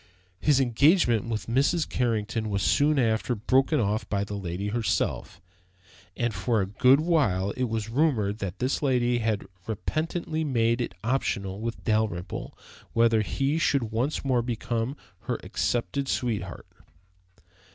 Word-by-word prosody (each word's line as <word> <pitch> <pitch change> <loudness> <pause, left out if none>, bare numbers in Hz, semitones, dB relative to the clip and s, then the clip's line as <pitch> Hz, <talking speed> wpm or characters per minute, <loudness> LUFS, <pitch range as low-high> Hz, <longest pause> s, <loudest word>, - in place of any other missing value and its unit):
His 145 -3 +3
engagement 125 - +3
with 110 -2 -3
Mrs. 140 +8 +1
Carrington 115 -2 -1
was 100 -2 -1
soon 150 +7 +3
afterward 115 -2 0
broken 135 +4 +3
off 105 -1 -1
by 100 -1 0
the 100 - -6
lady 95 0 -3
herself, 115 0 -1 0.8
and 120 -2 0
for 115 +1 0
a 95 - +1
good 125 +8 +4
while 105 - +1
it 125 - -1
was 110 -2 -3
rumored 115 -7 +1
that 100 -2 -4
this 130 +2 -1
lady 125 -3 +2
had 110 -3 -1 0.2
repentantly 155 - -2
made 120 -4 +1
it 105 -6 -4
optional 100 -5 -1
with 115 +1 -4
Dalrymple 110 -6 -2 0.4
whether 115 -1 +4
he 140 +8 0
should 135 -8 +1
once 130 +7 -1
more 130 -3 +2
become 120 +2 -2 0.3
her - - -1
accepted 135 +3 -1
sweetheart. 105 -9 -2
115 Hz, 140 wpm, -27 LUFS, 105-135 Hz, 0.8 s, good